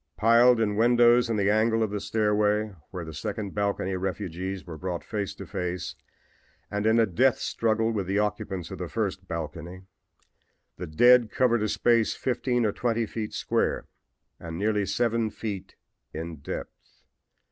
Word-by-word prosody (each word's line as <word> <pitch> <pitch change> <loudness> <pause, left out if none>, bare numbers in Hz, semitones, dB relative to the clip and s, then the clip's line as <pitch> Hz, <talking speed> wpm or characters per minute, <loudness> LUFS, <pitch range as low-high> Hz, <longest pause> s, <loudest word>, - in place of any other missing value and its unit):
"Piled 115 +2 +5
in 105 -2 0
windows 120 +1 +5
in 115 - 0
the 100 0 +2
angle 110 +1 +2
of 110 - -2
the 105 - -2
stairway 105 -1 +1 0.2
where 90 -3 -6
the 80 - -8
second 100 +4 -4
balcony 100 -2 -1
refugees 95 0 -4
were 85 -3 -7
brought 90 +1 -4
face 100 -6 -4
to - - -8
face 90 -1 -4 0.8
and 105 +1 0
in 110 +1 +4
a 115 - +5
death 120 +6 +2
struggle 115 0 0
with 100 -5 -2
the 100 +1 0
occupants 105 -4 -2
of - - -7
the - - -4
first - - -3
balcony, 90 +3 -6 0.9
the 90 - -5
dead 120 +8 +5
covered 120 -3 +2
a 105 - 0
space 115 0 +2
fifteen 125 -1 0
or 105 - +2
twenty 115 +1 0
feet 110 0 -5
square - - -1 0.5
and 80 -1 -7
nearly 105 0 0
seven 115 +2 +1
feet 105 -3 -6 0.4
in 80 0 -5
depth. 70 - -9
105 Hz, 160 wpm, -27 LUFS, 95-115 Hz, 0.9 s, Piled